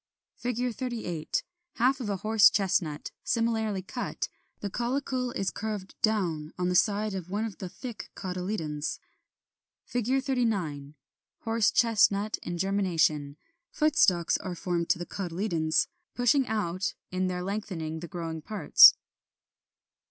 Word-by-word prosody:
] - - -28
[Illustration: 245 0 -1
Fig. 240 -3 -3
38. 225 - -3 0.3
Half 260 +3 +2
of 235 -5 -4
a 200 - -1
horse 215 +1 +6
chestnut, 175 -6 0
similarly 220 -4 0
cut; 190 - -4 0.3
the 205 - -3
caulicle 250 +1 -1
is 195 -6 -1
curved 210 -3 -5
down 170 -8 0
on 180 0 0
the - - +1
side 210 +2 +2
of 185 -2 -5
one 210 +4 -1
of 215 -4 -7
the 185 - -5
thick 240 +3 -8
cotyledons. 180 -5 -3 0.9
39. 230 - -1 0.5
Horse 225 -1 +2
chestnut 215 -2 +3
in 175 - -4
germination; 165 -7 +1 0.3
foot 305 -1 +1
stalks 175 -3 +3
are 180 -2 -5
formed 170 -1 -2
to - - +3
the 175 - -5
cotyledons, 170 -4 0 0.3
pushing 245 +2 +3
out 195 -2 -1 0.2
in 185 0 0
their 180 -1 -2
lengthening 180 -5 -4
the 175 - -7
growing 165 -2 -5
parts. 210 +6 +7
195 Hz, 135 wpm, -28 LUFS, 175-225 Hz, 0.9 s, parts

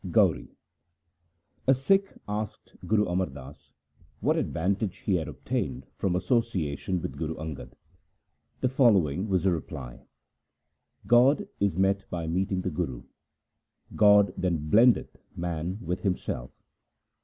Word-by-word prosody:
Gauri - - +3 1.2
A 135 - +6
Sikh 195 +9 +2 0.2
asked 105 0 -5
Guru 105 -1 +3
Amar 90 +1 0
Das 65 +1 -12 0.5
what 150 +9 +2
advantage 100 - -1
he 100 - +2
had 80 - -3
obtained 65 0 -3
from 90 -2 -1
association 90 - 0
with - - -4
Guru 80 0 -2
Angad. 80 -3 -7 0.9
The 130 - +2
following 105 - +3
was 95 -3 +1
the 95 - +3
reply: - - -6 0.5
— - - -37
God 125 +4 +4
is 100 -4 +1
met 95 +1 +1
by 85 -2 -3
meeting 95 +3 -1
the - - -2
Guru; 75 -7 -3 0.9
God 105 -3 +6
then 80 -5 -2
blendeth 120 +3 +4 0.2
man 85 +2 -3
with 90 +2 -2
Himself. 90 - -2
95 Hz, 125 wpm, -27 LUFS, 80-105 Hz, 1.2 s, A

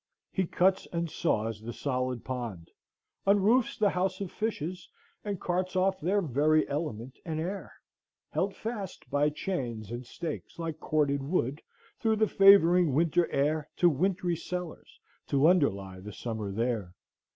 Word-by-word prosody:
He 190 -3 0
cuts 185 +3 +2
and 170 -2 -2
saws 110 -8 -1
the 120 +2 -6
solid 130 -3 -2
pond, 115 -10 -5 0.6
unroofs 220 +7 +4
the 205 -2 +3
house 185 +1 -1
of 195 -3 -4
fishes, 180 -5 -3 0.3
and 205 -3 -3
carts 185 +1 -1
off 190 +1 +1
their 195 +5 +1
very 155 +2 +3
element 135 -4 -4
and 160 -2 -3
air, 185 +5 -4 0.6
held 195 +1 -1
fast 215 -5 -6
by 145 +1 +3
chains 120 - -4
and 120 +1 -4
stakes 160 +5 -6
like 165 -2 -4
corded 145 -3 +1
wood, 140 -1 -1 0.4
through 220 -1 +2
the 215 0 +3
favoring 180 -6 +6
winter 170 +2 +2
air, 150 +2 0
to 175 -1 +5
wintry 180 +3 0
cellars, 180 0 -6 0.3
to 140 +2 +4
underlie 100 - +2
the 105 +2 -9
summer 110 -3 -4
there. 110 -4 -2
160 Hz, 145 wpm, -29 LUFS, 130-185 Hz, 0.6 s, favoring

